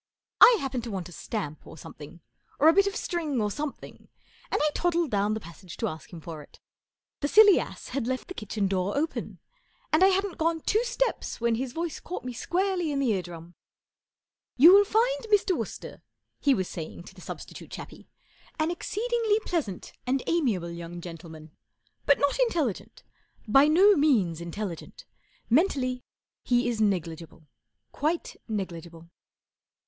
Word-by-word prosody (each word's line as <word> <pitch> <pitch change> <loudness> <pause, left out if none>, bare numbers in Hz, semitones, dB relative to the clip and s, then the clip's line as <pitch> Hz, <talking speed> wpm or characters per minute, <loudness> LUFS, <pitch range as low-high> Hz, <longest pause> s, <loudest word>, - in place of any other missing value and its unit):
1 485 - +9
hap¬ 270 -1 -3
pened 250 -2 -2
to 235 - -7
want 185 -4 -5
a - - -13
stamp 155 -3 -5
or - - -11
something, 150 +3 -11 0.4
or 295 - +4
a 325 - +8
bit 395 +2 +4
of 400 - -2
string 320 - -2
or 210 -1 0
something, 295 +4 -7 0.4
and - - 0
I 300 - +3
toddled 345 -3 0
down 205 +1 +1
the - - -3
passage 175 -1 -12
to 225 - -1
ask 160 -5 -8
him 170 - -8
for 160 -1 -8
it, 145 - -17 0.6
The 285 - -1
silly 415 +4 +7
ass - - -7
had 250 -2 -2
left 260 0 -3
the 370 - -7
kitchen 215 - -2
door 190 +4 -1
open; 315 +3 -3 0.6
and 315 +4 +5
I - - +8
hadn't 390 -1 0
gone 325 0 +1
two 435 +8 +1
steps - - -2
when 235 0 +1
his 250 +2 -2
voice 330 +2 -4
caught 355 - -7
me 250 - -4
squarely 355 +5 -1
in 285 - -1
the 270 -4 +1
eardrum, 175 -2 -6 0.5
" - - -67
You 325 +8 +9
will 405 +1 +7
find 480 +4 +2
Mr, 415 -4 +2
Wooster/' - - -6 0.4
he 280 -2 +3
was 185 -2 -2
saying 165 +1 -7
to 190 - -13
the 185 - -15
substitute - - -9
chappie, - - -10 0.5
,4 - - +3
an 320 - 0
exceedingly 440 +4 0
pleasant 285 - -3
and 260 0 0
amiable 225 - 0
young 170 0 -7
gentleman, 165 -2 -10 0.6
but 285 - +6
not 285 - +1
intelligent. 335 - -1 0.4
By 270 +7 +6
no 385 +7 +6
means 215 - +2
intelligent. 185 - -6 0.4
Mentally 255 -3 +1 0.4
he 245 0 +1
is 230 -2 -1
negligible 165 -5 -2 0.5
—quite 315 +4 -2
negligible. 170 -5 -6
255 Hz, 170 wpm, -27 LUFS, -, 0.6 s, 1